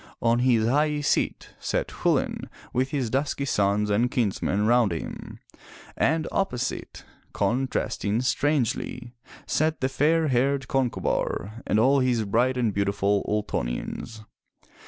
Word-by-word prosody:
On 115 0 +2
his 120 -3 +3
high 150 +3 +2
seat 145 - 0
sat - - -2
Chulain - - -1 0.2
with 130 +2 +1
his 130 -6 -2
dusky 140 +1 -1
sons 105 -3 +1
and 115 +4 +2
kinsmen 105 -3 0
round 120 -3 +4
him, 80 - -6 0.6
and 160 +1 +1
opposite, 125 -10 -2 0.3
con 120 +7 0
trasting 110 -2 -1
strangely, 130 -3 -1 0.3
sat 155 +1 0
the 130 - 0
fair 155 +3 +2
haired 135 +1 +1
Concobar, 120 -4 -1
and - - +2
all 135 +5 +4
his 125 -4 +1
bright 120 +6 +1
and 115 -4 +1
beautiful 100 0 +1
Ultonians. 105 - -3
120 Hz, 125 wpm, -25 LUFS, 105-135 Hz, 0.6 s, round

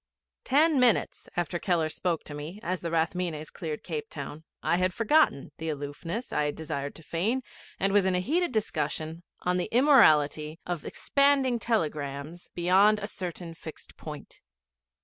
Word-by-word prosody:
Ten 295 +2 +4
minutes 245 -4 +3
after 175 0 -1
Keller 170 -4 +1
spoke 165 +1 -2
to 150 - -8
me, 150 +7 -7
as 185 0 -2
the 170 - -3
Rathmines 165 -1 -1
cleared 155 -3 -5
Cape 450 -1 -4
Town, 155 +2 -7 0.2
I 170 - +2
had 185 0 +1
forgotten 230 - +3
the 160 0 -3
aloofness 155 - -5
I 150 0 +1
desired 145 -2 -4
to 165 - -13
feign, 210 - -1 0.4
and 195 +1 +2
was 205 -2 +4
in 185 - +2
heated 310 - +1
discussion 160 - -2 0.2
on 180 0 +1
the 180 - -2
immorality 155 - +5
of 175 -4 -3
expanding 275 -3 +2
telegrams 155 - -2
beyond 190 +5 +5
a 205 - -4
certain 175 -4 -6
fixed 160 -1 -11
point. - - -10
175 Hz, 150 wpm, -28 LUFS, 155-220 Hz, 0.4 s, immorality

